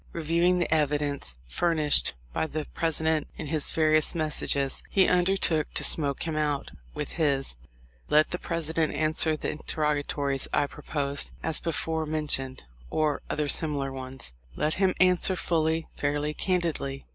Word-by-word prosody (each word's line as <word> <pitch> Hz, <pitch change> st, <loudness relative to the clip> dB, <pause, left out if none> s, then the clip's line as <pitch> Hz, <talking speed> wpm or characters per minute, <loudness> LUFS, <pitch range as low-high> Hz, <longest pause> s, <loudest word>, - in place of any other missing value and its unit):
Reviewing 170 Hz, +2 st, +2 dB
the 175 Hz, -2 st, 0 dB
evidence 145 Hz, -, 0 dB
furnished 155 Hz, -, +3 dB, 0.2 s
by 160 Hz, -, -1 dB
the 155 Hz, 0 st, -4 dB
President 160 Hz, -1 st, 0 dB
in -, -, -5 dB
his 150 Hz, 0 st, -1 dB
various 155 Hz, 0 st, +2 dB
messages, 150 Hz, -3 st, -1 dB
he 190 Hz, -2 st, +4 dB
undertook 180 Hz, -4 st, +2 dB
to -, -, +1 dB
"smoke 140 Hz, -3 st, +2 dB
him 160 Hz, -2 st, -3 dB
out" 150 Hz, -2 st, -1 dB, 0.2 s
with -, -, -5 dB
this: 140 Hz, -, 0 dB, 0.5 s
"Let 155 Hz, +1 st, +4 dB
the 180 Hz, -, -2 dB
President 160 Hz, -2 st, -1 dB
answer 155 Hz, +1 st, +3 dB
the -, -, -3 dB
interrogatories 145 Hz, -3 st, -1 dB
I -, -, +2 dB
proposed, 140 Hz, 0 st, -2 dB
as 160 Hz, -1 st, +3 dB
before 160 Hz, -1 st, -2 dB
mentioned, 145 Hz, -4 st, -2 dB, 0.3 s
or 155 Hz, -2 st, 0 dB
other 150 Hz, -1 st, -1 dB
similar 145 Hz, -3 st, +1 dB
ones. 130 Hz, -, -8 dB, 0.2 s
Let 155 Hz, +1 st, 0 dB
him 190 Hz, -1 st, +3 dB
answer 185 Hz, 0 st, +4 dB
fully, 160 Hz, -2 st, 0 dB
fairly, 145 Hz, +1 st, -1 dB
candidly. 165 Hz, -7 st, -1 dB
155 Hz, 140 wpm, -27 LUFS, 145-165 Hz, 0.5 s, he